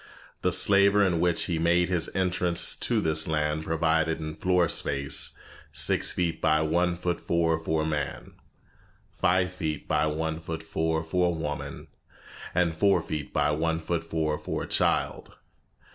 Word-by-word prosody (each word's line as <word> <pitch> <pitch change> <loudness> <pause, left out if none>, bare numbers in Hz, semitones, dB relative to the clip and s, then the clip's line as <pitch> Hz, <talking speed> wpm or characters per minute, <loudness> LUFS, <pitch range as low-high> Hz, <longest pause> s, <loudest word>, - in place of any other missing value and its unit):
The - - +1
slaver 100 0 +4
in 90 -3 +1
which 85 -1 +2
he 85 -3 -2
made 85 +1 +3
his 90 -3 -1
entrance 90 -2 +1
to - - -1
this 80 -1 +1
land 75 0 -1
provided 80 0 +1
in 80 -1 -5
floor 90 +1 +2
space 70 -2 0 0.3
six - - +2
feet 85 -2 -2
by 80 -1 +3
one 85 +3 +1
foot 90 0 -3
four 80 -1 +1
for 80 -1 -1
a - - -2
man, 75 -3 -4 0.8
five 90 0 +1
feet 80 -5 -4
by - - +1
one 80 +1 -2
foot 80 0 -6
four 80 0 -1
for 90 +2 +1
a 85 - -1
woman, 75 -2 -5 0.7
and 85 -2 +2
four 100 +4 +3
feet 75 -3 -5
by 75 0 +1
one 80 +2 0
foot 85 +1 -2
four 80 -2 -2
for - - -4
a - - -7
child. - - 0
80 Hz, 160 wpm, -27 LUFS, 80-90 Hz, 0.8 s, slaver